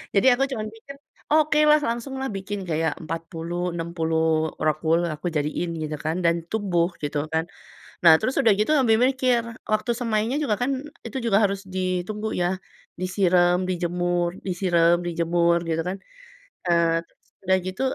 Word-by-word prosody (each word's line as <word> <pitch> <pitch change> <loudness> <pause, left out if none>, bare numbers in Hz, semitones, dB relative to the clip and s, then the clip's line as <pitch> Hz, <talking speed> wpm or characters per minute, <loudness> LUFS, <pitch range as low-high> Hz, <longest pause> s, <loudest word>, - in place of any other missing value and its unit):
Jadi 200 +6 +4
aku 255 +2 +1
cuma 220 -5 -3
mikir, 225 +6 -10 0.4
“Okelah 300 0 +5
langsunglah 265 +2 -3
bikin 195 -1 -5
kayak 160 0 0
40, 165 +2 -4
60 160 -1 0
rockwool 160 +2 +1
aku 155 +3 -4
jadiin,” 160 +3 -2
gitu 155 0 -3
kan 160 +3 -2
dan 170 0 +4 0.2
tumbuh 185 -5 +1
gitu 145 0 -1
kan. 160 0 +1 0.6
Nah, 165 - +10
terus 255 +5 -1
sudah 230 -6 +5
gitu 210 - +1
ambi 240 -6 +4
mikir, 255 -2 +2 0.3
waktu 215 +2 0
semainya 230 +2 0
juga 265 -8 +1
kan 250 - +1 0.4
itu 230 +3 -4
juga 205 -3 +3
harus 195 0 0
ditunggu 185 +4 -2
ya. 175 - +2 0.5
Disirem, 180 -1 +2
dijemur 175 0 -1
disirem, 175 -2 +3
dijemur, 170 0 +1
gitu 165 0 0
kan. 190 - -3 0.7
Eee, 170 -1 +2
terus - - -37 0.2
udah 190 0 +3
gitu, 185 +4 -5
180 Hz, 145 wpm, -24 LUFS, 165-215 Hz, 0.7 s, Nah